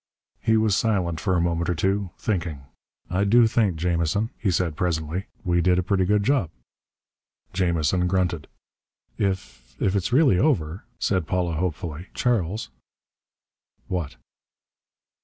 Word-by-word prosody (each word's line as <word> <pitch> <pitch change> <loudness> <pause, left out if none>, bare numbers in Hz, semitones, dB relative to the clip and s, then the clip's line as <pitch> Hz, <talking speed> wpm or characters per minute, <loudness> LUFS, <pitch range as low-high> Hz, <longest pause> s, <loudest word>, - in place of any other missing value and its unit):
He 110 0 +3
was 110 -2 +3
silent 95 -8 0
for 95 0 0
a - - +2
moment 85 0 0
or 90 - +1
so, 95 +2 +1
thinking. 85 -9 -2 0.5
"I 95 +2 +1
do 115 +4 +5
think, 110 -5 +2
Jamison," 85 +5 0
he 100 - 0
said 85 -3 0
presently, 85 +2 -2 0.2
"we 85 -1 +2
did 90 0 +3
a 90 - +1
pretty 95 0 +1
good 105 +2 +2
job." 130 - +2 1.0
Jamison 90 -1 +1
grunted. 90 -4 0 0.7
"If 60 -11 -3
if 95 0 +1
it's 100 +3 0
really 130 - +4
over," 90 - 0
said 95 -5 0
Paula 90 0 0
hopefully, 85 0 -3
"Charles 110 -3 0 0.6
" - - -47
"What?" 85 -9 -3
90 Hz, 140 wpm, -24 LUFS, 85-100 Hz, 1.0 s, do